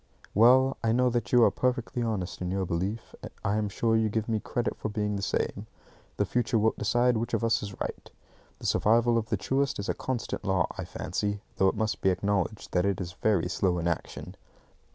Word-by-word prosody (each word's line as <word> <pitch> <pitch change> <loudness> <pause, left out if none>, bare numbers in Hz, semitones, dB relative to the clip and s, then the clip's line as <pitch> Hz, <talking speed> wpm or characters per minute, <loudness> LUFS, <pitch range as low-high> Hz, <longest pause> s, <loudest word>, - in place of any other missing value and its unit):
Well, 130 +5 +5
I 110 -1 +2
know 125 +1 +3
that 115 -5 -2
you 120 -1 +6
are - - +5
perfectly 125 0 -1
honest 105 -7 -3
in 90 - -2
your 95 0 -1
belief. 95 +7 -3 0.3
I 100 +2 +1
am 105 -1 0
sure 115 +3 +1
you 110 -1 +2
give 110 +1 -2
me 110 -2 0
credit 120 +3 -2
for - - -4
being 105 -1 -1
the 100 - -3
same. - - -2 0.5
The - - +2
future 120 0 0
wilt 110 +1 +1
decide 120 +3 +2
which 120 +2 -1
of - - -2
us 115 0 +2
is 100 -2 -7
right. - - -5 0.5
The - - -11
survival 115 +2 +3
of 110 -1 -6
the 110 - +1
truest 135 +8 0
is 100 +2 -4
a - - +2
constant 125 -4 -4
law, 95 -4 +2
I - - -5
fancy, 105 0 -3 0.2
though 95 - +4
it - - +1
must 110 -1 -1
be 95 - +3
acknowledged 100 +2 -1
that 90 - +2
it 100 -1 0
is 90 -2 -4
very 105 -6 +1
slow 90 -2 0
in 85 0 -1
action. 85 - -4
110 Hz, 215 wpm, -28 LUFS, 95-120 Hz, 0.5 s, you